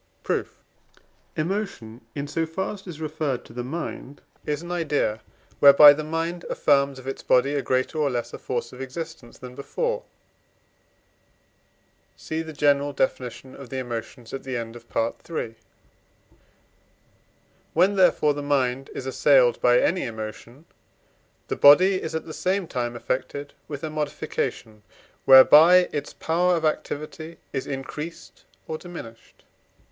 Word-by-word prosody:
Proof. - - -2 0.8
Emotion, 155 - -3
in 140 0 -4
so 165 +3 -2
far 190 +6 -3
as 200 - -10
it - - -20
is 165 -4 -8
referred 155 -4 -3
to - - -14
the 120 0 -4
mind, 145 0 -6 0.2
is 150 +2 -2
an 175 - -7
idea, 145 -10 -1 0.4
whereby 145 +1 +9
the 155 +1 -4
mind 165 +3 -3
affirms 140 -1 +2
of 130 - -12
its 135 - -5
body 130 +3 +3
a 145 - 0
greater 130 +5 -1
or 145 -2 +2
less 120 -2 -3
force 120 -1 -4
of 125 - -9
existence 135 -2 -8
than 125 -1 -10
before 485 - -3 2.2
(cf. 160 +1 -4
the - - -6
general 145 -1 +2
Definition 130 -1 -3
of 135 -3 -11
the 130 - -5
Emotions 120 -1 -6
at 135 - -4
the 130 -2 -4
end 115 0 -6
of 120 0 -14
Part 115 +1 -1
III.). 120 -9 -4 2.2
When, 185 +5 +4
therefore, 165 -5 +4
the 145 - -5
mind 135 -2 0
is 130 - -5
assailed 130 -2 +3
by 125 0 +5
any 180 +3 +1
emotion, 115 +5 -8 0.8
the - - -2
body 185 +7 +6
is 160 - -5
at 160 - -3
the 155 - -8
same 190 +3 -1
time 120 -5 -3
affected 130 +4 -4
with 145 -1 -7
a 155 - -3
modification 145 -7 -4 0.4
whereby 160 +7 +8
its 145 -1 -3
power 175 +2 +1
of 165 -1 -1
activity 155 +1 -4 0.2
is 135 - -3
increased 150 +4 -7 0.2
or 155 0 -4
diminished. 115 -11 -11
145 Hz, 145 wpm, -24 LUFS, 130-160 Hz, 2.2 s, whereby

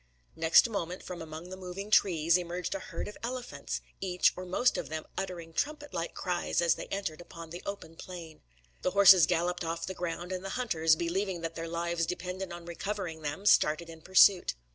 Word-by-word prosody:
Next 160 +7 +6
moment, 185 -5 -4
from 180 -2 -7
among 160 +2 -8
the - - -5
moving 190 +2 -7
trees, 170 -5 +4
emerged 180 0 -2
a 295 - -3
herd - - -6
of 210 - -9
elephants, 245 +1 -4 0.2
each 180 -2 +2
or 185 0 -7
most 245 +7 +2
of - - -4
them 155 0 -4
uttering 175 -4 -5
trumpet 295 - -2
like 170 0 -3
cries 180 -2 -1
as 170 -1 +4
they - - -7
entered 195 -5 -4
upon 165 -1 -10
the 175 - -7
open 200 -5 -6
plain. 165 -3 -9 0.4
The - - +1
horses 190 -5 +9
galloped 175 +1 0
off 165 0 -3
the 190 - -4
ground; 175 0 -4
and 185 0 -3
the 195 - -4
hunters, 165 -10 +3
believing 175 +2 -2
that 165 0 -3
their 165 0 -5
lives 170 0 -1
depended 180 +1 -4
on 175 0 -8
recovering 175 -1 -4
them, 150 +6 -4
started 165 -3 +4
in 165 -1 -12
pursuit. 190 - +5
175 Hz, 195 wpm, -30 LUFS, 165-190 Hz, 0.4 s, horses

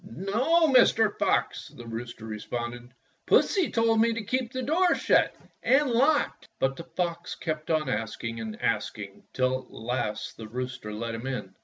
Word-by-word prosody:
"No, 240 - +2
Mr. 225 -4 +5
Fox," - - +1
the 120 - -12
rooster 115 0 -6
responded, 120 +3 -5 0.4
"Pussy 380 -5 +4
told 225 -1 +3
me 230 0 +4
to 230 -1 -4
keep 250 +2 -1
the 260 -1 -3
door 335 +6 +3
shut - - +3 0.3
and 270 +1 +3
locked." 280 +6 +2
But 135 0 +1
the 165 - -8
fox 170 0 -3
kept 155 -2 -4
on 155 -3 +1
asking 115 0 -3
and 110 -1 -6
asking 105 -3 -2
till 130 0 +1
at - - -23
last 115 -2 -3
the 110 - -8
rooster 125 -2 -5
let 115 +2 -4
him 115 +3 -5
in. 135 -2 -4
135 Hz, 165 wpm, -27 LUFS, -, 0.4 s, Mr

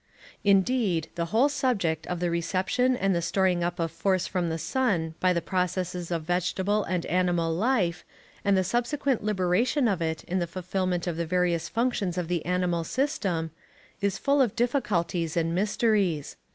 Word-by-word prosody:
Indeed, 195 -4 +2
the 170 -1 -2
whole 225 +11 +3
subject 225 - 0
of 180 -1 -3
the 175 -1 0
reception 190 +9 +1
and 195 -3 +1
the 170 - 0
storing 180 0 +1
up 175 0 -2
of 165 -1 -1
force 185 +3 0
from 180 -3 -1
the 160 - -2
sun 170 - 0
by 185 - +3
the 170 -2 0
processes 180 -1 -2
of 170 -2 -2
vegetable 185 +4 0
and 180 -2 -2
animal 175 -2 +1
life, 185 -3 +1 0.4
and 200 -1 +3
the 185 - +3
subsequent 240 +5 0
liberation 210 - +1
of 195 -5 0
it 160 -1 -2
in 185 +2 -2
the 175 - -1
fulfillment 185 0 -2
of 175 -3 -2
the 170 -1 -2
various 175 -1 0
functions 225 -7 -1
of 175 -2 -2
the 175 -3 -1
animal 180 -2 0
system, 185 - -1 0.5
is 200 -1 0
full 280 0 +2
of 235 -4 +1
difficulties 185 - 0
and 165 0 +1
mysteries. 200 - +1
180 Hz, 170 wpm, -27 LUFS, 170-210 Hz, 0.5 s, whole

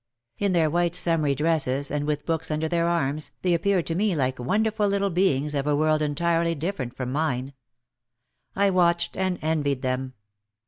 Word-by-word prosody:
In 200 -2 +1
their 165 -3 +3
white 175 +2 0
summery 160 -6 +2
dresses 145 -3 +1
and 145 0 -2
with 150 -1 -2
books 165 -1 -2
under 155 +1 -1
their 170 +1 0
arms, 155 -3 -1
they 180 -1 +2
appeared 180 +1 +1
to 165 - -2
me 195 +1 +1
like 130 -3 -1
wonderful 210 - 0
little 200 0 0
beings 150 -5 +1
of 140 0 -1
a 145 - +2
world 155 +1 +2
entirely 165 +3 0
different 145 -6 -4
from 130 -1 -3
mine. 135 -2 -1 1.0
I 200 0 +3
watched 170 -2 +2
and 185 -1 -1
envied 145 -4 0
them. 130 0 -2
160 Hz, 175 wpm, -25 LUFS, 145-175 Hz, 1.0 s, their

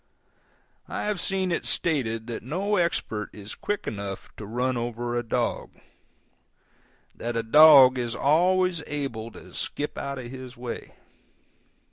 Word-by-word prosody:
I - - -4
have 210 -4 -1
seen 190 -2 +1
it 170 - -1
stated 115 -9 0
that 115 -1 -5
no 190 - -1
expert 115 - -1
is 105 0 -9
quick 205 -1 -3
enough 100 -2 -5
to 105 - -8
run 125 +3 -1
over 120 0 -3
a 120 - +1
dog; 115 - -2 1.4
that 120 0 -4
a 115 - 0
dog 135 0 +8
is 120 -1 -2
always 180 +4 +2
able 135 -7 -4
to - - -14
skip 145 - -4
out 140 0 -4
of 125 -2 -7
his 130 -2 -9
way. 120 -1 -7
130 Hz, 140 wpm, -26 LUFS, 115-160 Hz, 1.4 s, dog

